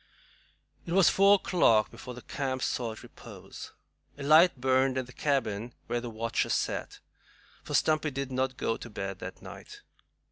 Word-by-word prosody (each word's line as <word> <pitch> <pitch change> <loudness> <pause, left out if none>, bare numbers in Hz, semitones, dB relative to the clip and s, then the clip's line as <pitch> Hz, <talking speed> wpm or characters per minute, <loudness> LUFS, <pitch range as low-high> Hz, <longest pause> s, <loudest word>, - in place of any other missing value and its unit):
It 170 - -3
was 190 -1 +5
four 200 +1 +6
o'clock 115 - +3
before 125 -1 -9
the 125 - -11
camp 130 -2 -3
sought 115 -3 -3
repose. - - -11 0.5
A 140 - -7
light 155 +1 +5
burnt 130 +1 +2
in 130 - -1
the 125 - -14
cabin 120 -5 -1
where 120 - -2
the 120 - -6
watchers 115 +1 -1
sat, - - -3 0.6
for - - -4
Stumpy 155 0 +2
did 140 -1 -5
not 130 0 -1
go 115 - -1
to 120 - -9
bed 95 -3 -5
that - - -8
night. - - -11
130 Hz, 165 wpm, -29 LUFS, 120-145 Hz, 0.6 s, four